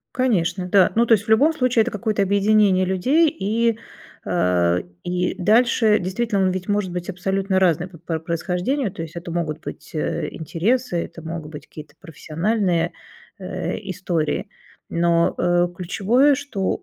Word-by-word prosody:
Конечно, 190 -8 0
да. 185 0 +4
Ну, 235 +1 +4
то 225 - +6
есть 205 0 -1
в - - -20
любом 280 +9 +5
случае 250 -6 +2
это 245 - -3
какое-то 215 -3 -1
объединение 200 -1 +3
людей, 255 - +2
и, 230 -4 0 0.5
а, 90 -1 +1 0.3
и 180 0 -1
дальше 220 +2 +4
действительно 195 +2 -1
он 185 - +3
ведь 185 +1 -4
может 205 -2 0
быть 175 0 -5
абсолютно 190 +1 -1
разным 175 0 +2
по 170 - -14
пр 165 0 -3
происхождению. 180 - -2
То - - -6
есть 165 -1 -8
это 170 0 -6
могут 160 -2 -3
быть, - - -9
э, 155 - -2
интересы, 190 - -1
это 165 - -11
могут 160 -1 -6
быть 150 - -9
какие-то 155 0 -12
профессиональные, 170 +2 -1 0.5
э, - - -4
истории, 170 -4 -2 0.4
но, 170 0 +2
э, 175 0 +2
ключевое, 220 +11 +2
что 260 -9 -3
185 Hz, 155 wpm, -22 LUFS, 170-220 Hz, 0.5 s, то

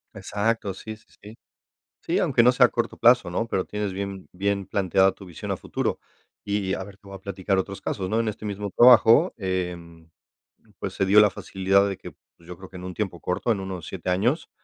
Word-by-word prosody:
Exacto, 105 -1 -2
sí, 110 +2 -8
sí, 110 +2 -25 0.2
sí. 105 +2 -11 0.6
Sí, - - -1
aunque - - +3
no 120 +1 +6
sea 125 0 +5
a - - +1
corto 120 - -3
plazo, 120 -5 +4
¿no?, 100 +6 -2
pero, 95 -5 -1
tienes 105 -2 -4
bien 100 0 -6
bien 100 +1 -1
planteada 95 0 +2
tu 95 +1 -14
visión 85 -4 -7
a - - -2
futuro. - - -3 0.4
Y 100 -2 -1
a 95 - -3
ver, 95 0 -13
te 100 - -19
voy 100 - -9
a - - -9
platicar 95 0 -2
otros 100 +1 -4
casos, 95 -2 -4
¿no?, 110 - +1
en 115 - 0
este 110 0 -5
mismo 100 -1 -4
trabajo, 120 +6 +7
em, 90 -4 -5 0.7
pues, - - -4
se 95 - 0
dio 100 +2 +6
la 105 0 +6
facilidad 95 +1 +1
de 95 - -4
que, - - -10 0.3
pues, 85 - -21
yo 90 - -8
creo 95 +1 -12
que 95 - -11
en 90 - -8
un 90 -1 -7
tiempo 95 -5 -3
corto, 90 +6 -1
en 105 - 0
unos 95 -4 -6
7 95 -1 -5
años, 120 - 0
100 Hz, 225 wpm, -24 LUFS, 95-105 Hz, 0.7 s, trabajo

